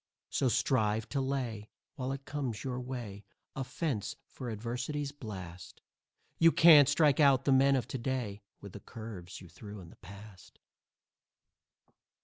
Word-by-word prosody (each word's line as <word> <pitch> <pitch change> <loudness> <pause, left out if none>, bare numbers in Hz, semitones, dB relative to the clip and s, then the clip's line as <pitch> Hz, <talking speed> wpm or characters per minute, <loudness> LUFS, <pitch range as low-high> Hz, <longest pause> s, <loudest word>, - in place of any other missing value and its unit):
So 130 - +1
strive 110 -2 +1
to 140 - -1
lay, 125 -6 -3 0.2
while 130 -3 -4
it 135 0 -6
comes 135 -7 -4
your 125 -2 -3
way, 120 -6 -6 0.3
A 135 - -2
fence 140 - -3
for 125 -3 -8
Adversity's 125 +6 -3
blast. 95 -10 -9 0.6
You 165 0 +7
can't 150 -5 +8
strike 150 -1 +3
out 135 -3 +5
the 140 - +3
men 135 +1 +5
of 125 -3 -1
to 135 - -4
day 115 -5 -3 0.2
With 100 -3 -10
the - - -8
curves 110 -8 -9
you 90 - -12
threw 100 +4 -10
in 85 -3 -12
the - - -16
past. 100 -1 -13
125 Hz, 150 wpm, -31 LUFS, 105-135 Hz, 0.6 s, can't